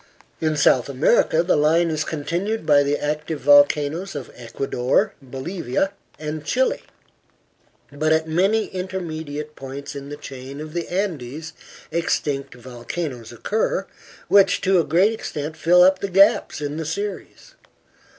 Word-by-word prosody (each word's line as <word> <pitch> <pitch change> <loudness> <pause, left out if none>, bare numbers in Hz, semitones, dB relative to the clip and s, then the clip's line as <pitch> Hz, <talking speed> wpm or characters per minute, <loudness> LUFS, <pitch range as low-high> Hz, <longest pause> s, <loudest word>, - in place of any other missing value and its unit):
In 155 -1 0
South 135 -3 +3
America 150 +4 +3
the 175 - +2
line 160 +3 +3
is 155 -1 -1
continued 170 +7 -3
by 145 -2 +5
the 145 +1 +1
active 150 +1 -3
volcanoes 145 +5 +4
of 140 -3 -6
Ecuador, 125 - -1
Bolivia 135 +5 -3 0.3
and 155 0 -5
Chile, 260 - 0 1.1
but 155 +2 0
at 160 0 +2
many 195 +7 +2
intermediate 160 -5 -5
points 135 +2 -8
in 140 0 -7
the 145 - -7
chain 135 0 -9
of 155 0 -8
the 170 -1 -3
Andes 160 -5 -3 0.4
extinct 145 -5 -1
volcanoes 125 +1 -6
occur, 220 - -1 0.4
which 200 -1 +5
to 190 -1 +3
a - - +3
great 180 +9 +3
extent 155 -7 -5
fill 170 +3 +5
up 190 +1 +5
the 200 - -3
gaps 200 -1 +4
in 145 +1 -3
the 160 - -3
series. 205 - -5
155 Hz, 140 wpm, -22 LUFS, 145-180 Hz, 1.1 s, by